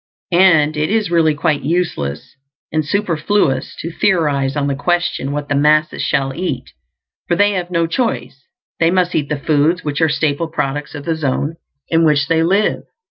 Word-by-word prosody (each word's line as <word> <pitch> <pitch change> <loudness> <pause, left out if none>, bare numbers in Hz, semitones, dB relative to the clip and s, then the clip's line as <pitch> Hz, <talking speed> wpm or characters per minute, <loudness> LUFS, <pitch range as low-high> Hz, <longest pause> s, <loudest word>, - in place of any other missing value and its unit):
And 160 -4 +4
it 150 +1 0
is 210 -3 0
really 160 -3 +3
quite 145 0 0
useless 140 - -2 0.4
and 155 0 0
superfluous 170 -5 0
to 165 - -5
theorize 150 -8 +1
on 145 -1 0
the 140 - 0
question 175 -1 -1
what 145 0 -3
the - - -1
masses 150 +2 +2
shall 135 -2 0
eat, 140 -6 -4 0.6
for 175 - +1
they 205 +3 +3
have 180 -3 -3
no 170 -2 +1
choice; 165 - -3 0.3
they 165 - +4
must 180 0 +1
eat 145 -3 -1
the 150 - -1
foods 155 +5 +1
which 145 +1 -2
are 160 - +4
staple 150 +1 0
products 145 -2 -3
of 145 - -8
the 165 -1 0
zone 150 +1 -2 0.3
in 165 0 +2
which 150 -3 +3
they 165 -1 +3
live. 195 +6 +1
155 Hz, 180 wpm, -17 LUFS, 145-175 Hz, 0.6 s, And